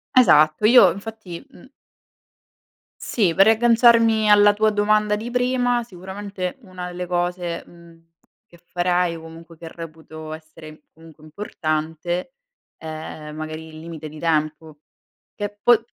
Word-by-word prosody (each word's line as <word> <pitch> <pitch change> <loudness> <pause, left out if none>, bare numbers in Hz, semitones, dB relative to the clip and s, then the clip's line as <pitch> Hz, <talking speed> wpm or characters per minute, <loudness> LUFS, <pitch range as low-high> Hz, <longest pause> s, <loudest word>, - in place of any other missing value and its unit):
Esatto, 155 -7 +5
io 215 -5 +7
infatti, 200 -2 -8
mhm 260 - -17 1.3
Sì, 195 -8 0
per 195 +3 +5
riagganciarmi 230 -1 +4
alla 205 0 +6
tua 215 +1 +2
domanda 210 0 +2
di 220 +3 -6
prima, 245 -1 +1
sicuramente 190 -1 -7
una 185 -4 -8
delle 180 0 -5
cose, 175 -1 -2
mhmm, 170 -1 -18 0.4
che 175 - -19
farai, 175 -1 0
o 165 - -10
comunque 165 +1 -13
che 165 0 -10
reputo 160 -1 -10
essere, 155 -1 -12
comunque, 160 -1 -17
importante, 160 +3 -4 0.4
è 155 -1 -8
magari 155 +1 -7
il 155 0 -11
limite 160 -1 -8
di 155 +1 -11
tempo. 155 -1 -2 0.6
Che 205 0 -6
poi 235 -1 +4
175 Hz, 130 wpm, -22 LUFS, 160-210 Hz, 1.3 s, io